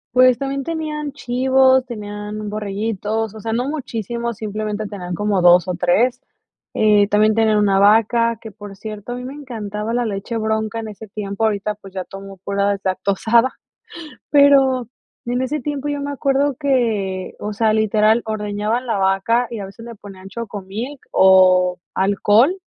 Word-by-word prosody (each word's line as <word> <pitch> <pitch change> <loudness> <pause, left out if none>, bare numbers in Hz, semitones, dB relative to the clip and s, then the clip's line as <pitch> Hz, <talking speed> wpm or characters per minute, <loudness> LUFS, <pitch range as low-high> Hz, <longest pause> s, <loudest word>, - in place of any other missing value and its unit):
Pues 255 -1 +6
también 275 +1 -3
tenían 305 -2 -4
chivos, 260 -1 +2
tenían 210 -2 -6
borreguitos, 215 +1 -3
o - - -8
sea, 225 - -3
no 245 +3 -1
muchísimos, 235 -5 -4
simplemente 215 0 -4
tenían 180 -4 -6
como 205 +1 0
2 175 0 +6
o 180 - -1
3. 210 +9 +1 0.5
Eh, 210 -1 +3
también 215 +1 +3
tenían 220 -1 +3
una 200 -2 +3
vaca 225 +3 +3
que, 225 - -9
por 200 -1 -11
cierto, 215 +1 -7
a 245 - -3
mí 250 - -7
me 260 - -6
encantaba 225 -6 -5
la 240 0 0
leche 210 +3 -4
bronca 220 0 -1
en 220 - -5
ese 215 0 -10
tiempo. 200 +1 -4
Ahorita, 210 -1 0
pues, 195 -2 -14
ya 185 -1 -4
tomó 195 0 -10
pura 200 0 0
deslactosada. 200 +5 +1 0.7
Pero 270 -4 +4 0.4
en 245 +1 -1
ese 290 +4 -2
tiempo 290 +1 -4
yo 290 -1 -2
me 285 - -3
acuerdo 280 0 +1
que, 220 -9 0
o 210 0 -4
sea, 220 +1 +2
literal, 215 +1 +3
ordeñaban 215 +3 -2
la 225 -4 -1
vaca 195 +6 +2
y 230 - -5
a - - -5
veces 230 +4 -12
le 235 - -8
ponían 195 -2 -12
Choco 210 0 -6
Milk 225 +9 -6
o 185 -1 +5 0.2
alcohol 210 - +3
215 Hz, 165 wpm, -20 LUFS, 200-245 Hz, 0.7 s, Pues